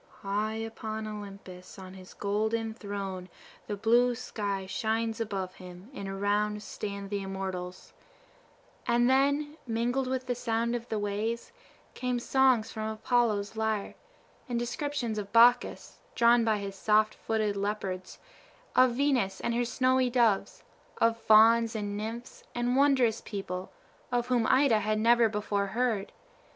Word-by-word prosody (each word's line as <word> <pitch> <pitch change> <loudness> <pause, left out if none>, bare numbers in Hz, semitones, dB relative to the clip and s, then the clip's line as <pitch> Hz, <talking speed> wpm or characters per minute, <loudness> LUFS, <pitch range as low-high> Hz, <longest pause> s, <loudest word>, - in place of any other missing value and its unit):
"High 210 +2 -1
upon 220 -1 -5
Olympus, 200 -3 -9
on 185 -1 -10
his 185 -1 -13
golden 220 +2 -1
throne, 195 -4 -6 0.4
the 205 - -3
blue 240 +3 +3
sky 205 -5 -4
shines 225 +3 -1
above 195 -4 -3
him, 180 +5 -12
and 200 -5 -6
around 205 +2 0
stand 200 -1 -6
the 200 -1 -1
immortals;" 190 -2 -6 0.9
and 240 0 +3
then, 285 +3 +2
mingled 245 +3 0
with 260 0 -2
the 250 - -1
sound 235 0 -1
of 235 0 -6
the 220 - -1
waves, 210 +3 -2 0.4
came 250 -1 -2
songs 255 -2 +2
from 220 0 -4
Apollo's 220 -2 0
lyre, 220 -2 -1 0.6
and 240 - -1
descriptions 240 -2 -2
of 200 -1 -7
Bacchus, 240 +2 +4 0.2
drawn 235 0 +5
by 220 -2 +2
his 200 -1 -6
soft 215 +2 +2
footed 215 -2 -1
leopards, 195 -2 -3 0.6
of 255 -1 +5
Venus 260 -8 +1
and 235 - -1
her 240 +1 +1
snowy 255 +1 +2
doves, 235 -5 +1 0.3
of 230 0 +3
fauns 230 +1 +5
and 205 -1 -3
nymphs, 225 +4 -6
and 240 +1 0
wondrous 260 -5 +3
people, 190 -3 -5 0.4
of 245 0 0
whom 240 -3 +2
Ida 260 -5 +4
had 215 +1 0
never 230 +1 +4
before 205 -1 -1
heard. 220 -2 -1
220 Hz, 140 wpm, -29 LUFS, 200-240 Hz, 0.9 s, drawn